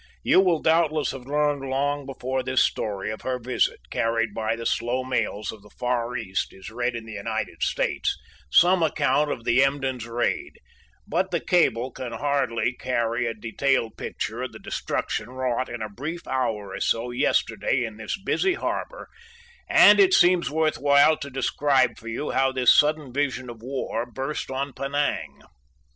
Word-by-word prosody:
You - - +5
will 180 -5 +2
doubtless 160 -2 +2
have 130 -1 -9
learned 145 0 +1
long 140 +1 -1
before 130 -1 -3
this 130 0 +2
story 100 -1 -2
of 110 - -7
her 130 -1 -2
visit, 125 - 0
carried 115 -1 0
by 110 +1 -1
the 115 0 -7
slow 125 +3 0
mails 125 -5 -2
of 110 - -12
the 105 - -17
Far 125 +1 -2
East, 95 -3 -3
is 95 +2 -10
read 120 +1 -2
in 115 -1 -6
the 110 - -9
United 100 -1 -4
States - - 0 0.3
some 180 - +5
account 150 -2 +2
of 120 - -4
the 125 +3 +4
Emden's 135 -4 -1
raid, 120 +1 -2 0.5
but 185 - 0
the 175 -2 0
cable 130 -9 +2
can 120 -1 -6
hardly 130 -3 0
carry 120 -1 -1
a 115 - -3
detailed 115 +2 0
picture - - -4
of - - -5
the - - -9
destruction - - -3
wrought 130 0 -2
in 120 -2 -5
a - - -3
brief 150 +11 -6
hour 110 -7 -2
or - - -5
so 115 +2 0
yesterday 125 +1 +1
in 110 -2 -6
this 110 - -4
busy 365 - +1
harbor, - - -4 0.6
and - - +7
it 380 -2 +6
seems 175 -2 +4
worth 155 +1 0
while 145 +2 +5
to 140 - -7
describe 135 0 +1
for 115 - -12
you 115 +6 -3
how 135 0 +2
this 130 -1 +5
sudden 150 -3 +2
vision 130 -3 -1
of 115 -2 -13
war 125 -2 -3
burst 135 +4 -4
on 135 +1 -3
Penang. 140 +2 -2
130 Hz, 175 wpm, -25 LUFS, 115-145 Hz, 0.6 s, and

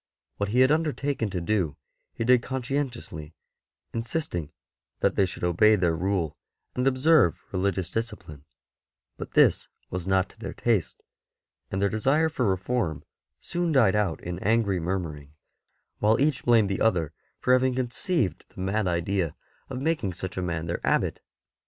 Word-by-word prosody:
What 100 -1 -1
he 125 +4 +3
had 130 +2 +5
undertaken 145 -6 0
to 95 - -3
do 85 -5 0 0.4
he - - -2
did 125 +1 +5
con 130 0 -4
scientiously, 120 - -4 0.6
insisting 115 - -3 0.5
that - - +3
they 95 - +2
should 90 - -8
obey 90 +5 +5
their 85 -4 +1
Rule 90 -2 -1 0.4
and 125 +1 0
observe 135 - +4
religious 95 -1 -1
discipline; 105 -11 -5 0.7
but - - -8
this - - +4 0.2
was 90 0 -4
not 95 0 +2
to - - -21
their 100 -4 -6
taste, 110 -9 0 0.7
and 95 - -2
their 100 - +3
desire 135 +10 +2
for 130 -7 0
reform 95 - -1 0.4
soon 175 -1 -2
died 115 -10 +4
out 100 -6 0
in 90 0 -4
angry 105 -2 +2
murmuring, 80 -5 -4 0.6
while 110 +2 +3
each 145 0 +1
blamed 115 -5 +4
the 95 - -2
other 90 -9 +2 0.3
for 125 - +3
having 130 0 +3
conceived 125 - -1
the - - -14
mad 95 +2 0
idea 85 -1 0 0.3
of - - -4
making 140 - 0
such 95 +2 -6
a 95 - -2
man 85 -3 -2
their 85 +1 -3
Abbot. - - +1
100 Hz, 160 wpm, -26 LUFS, 90-125 Hz, 0.7 s, had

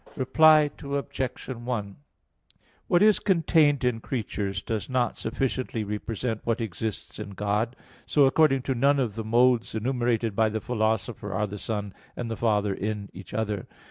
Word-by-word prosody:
Reply 155 +2 +5
Obj. 140 -2 -3
1: 120 -5 -4 0.9
What 175 +2 +4
is 215 -1 +5
contained 160 -7 +3
in 120 -2 +1
creatures 105 -5 -3
does 110 0 -3
not 125 -2 +1
sufficiently 120 -1 -2
represent 110 +2 -3
what 115 0 0
exists 110 -1 -5
in 100 - -7
God; 105 +4 -1 0.3
so 145 -2 +4
according 135 -1 +3
to 135 - 0
none 140 +3 +3
of 120 -6 0
the 110 +1 -4
modes 120 +1 +3
enumerated 120 -2 0
by 110 0 +3
the 110 +1 -2
Philosopher, 110 -2 -1
are 100 +2 0
the 105 0 -7
Son 105 -2 -3 0.2
and 120 -2 -4
the - - -2
Father 105 -3 +1
in 105 0 -4
each 95 +1 -11
other. 105 -3 -2
115 Hz, 155 wpm, -26 LUFS, 105-130 Hz, 0.9 s, Reply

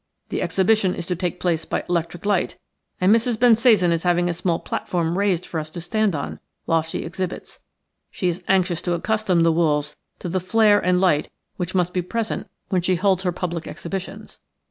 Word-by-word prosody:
"The - - -2
exhibition 195 -1 +2
is 175 - -5
to 180 - -2
take 175 +1 -3
place 165 -3 0
by - - -3
electric 175 +1 -2
lights 205 -3 0 0.4
and 185 +3 +5
Mrs. 230 0 0
Bensasan 225 -6 +5
is 165 -1 +1
having 175 0 +2
a - - 0
small 170 0 0
platform 170 -1 -2
raised 190 -3 +1
for 160 - -3
us 155 0 -6
to 170 - -7
stand 210 +2 0
on 140 - -5 0.3
while 165 -1 +2
she 160 +1 -5
exhibits. 180 +2 -5 0.5
She 185 - -2
is 175 +1 -1
anxious 185 -3 +2
to 175 - -1
accustom 190 -1 +1
the 165 - +4
wolves 150 -3 +1 0.2
to - - -6
the 185 +2 0
flare 205 +3 +4
and 180 0 +2
light 180 -6 +2 0.3
which 180 0 -3
must 180 -1 +1
be 180 - +1
present 225 +5 -3 0.2
when 185 -2 +1
she 185 +1 +1
holds 190 +1 +2
her 180 -2 0
public 175 -2 -4
exhibitions. 190 +2 -6
180 Hz, 195 wpm, -22 LUFS, 170-195 Hz, 0.5 s, and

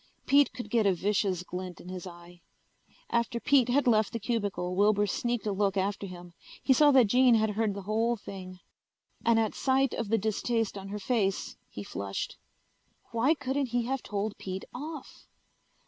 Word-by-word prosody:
Pete 285 0 +5
could 225 -2 -8
get 225 -3 +3
a 190 - +3
vicious 195 -1 0
glint 180 0 -6
in - - -12
his 185 0 -6
eye. 175 0 -13 0.7
After 235 0 0
Pete 260 -1 +3
had 280 +4 +3
left 220 -4 +3
the 230 - -2
cubicle 205 -5 -2
Wilbur 205 +1 +3
sneaked 240 +3 -2
a 210 - 0
look 195 0 0
after 200 +1 -1
him. 175 -1 -11 0.3
He 265 - +5
saw 295 +3 +6
that 265 -4 +6
Jean 245 +3 +5
had 220 -1 +2
heard 210 -1 0
the 200 - -6
whole 225 +4 +1
thing. 185 -2 -9 0.7
And 230 -1 +4
at 220 -1 0
sight 265 0 +1
of 230 -3 -3
the 225 - +3
distaste 220 +1 -1
on 195 -1 -7
her 205 +1 -5
face 205 -2 -1
he 105 - -7
flushed. 100 0 -5 0.7
Why 240 +7 +3
couldn't 275 -1 -1
he 240 0 0
have 265 +1 -2
told 205 +1 -3
Pete 190 0 -5
off? 300 +3 -8
215 Hz, 180 wpm, -29 LUFS, 195-240 Hz, 0.7 s, saw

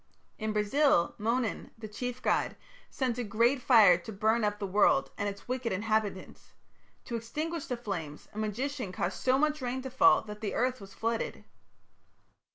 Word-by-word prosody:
In 215 -1 -2
Brazil, 210 - +2
Monan, 230 +1 -1
the 220 -1 -7
chief 245 +4 -5
god, - - +1 0.3
sent 250 -3 -2
a - - -1
great 235 +5 +2
fire 215 -9 +6
to 175 - -9
burn 220 +3 +1
up 210 0 0
the 205 - -4
world 190 -8 +3
and 205 0 -1
its 200 0 -10
wicked 250 -2 -2
inhabitants. 210 0 -2 0.5
To 235 - -4
extinguish 300 +8 -4
the 250 - -2
flames 175 -10 -6
a 215 - -6
magician 240 +2 -3
caused 175 0 -3
so 260 +1 +3
much 305 +1 +1
rain 255 +1 -3
to 265 - -6
fall 260 - +5
that 210 -1 -9
the 215 - -3
earth 255 -1 0
was 195 0 -12
flooded. 230 0 -2
225 Hz, 170 wpm, -30 LUFS, 205-255 Hz, 0.5 s, fire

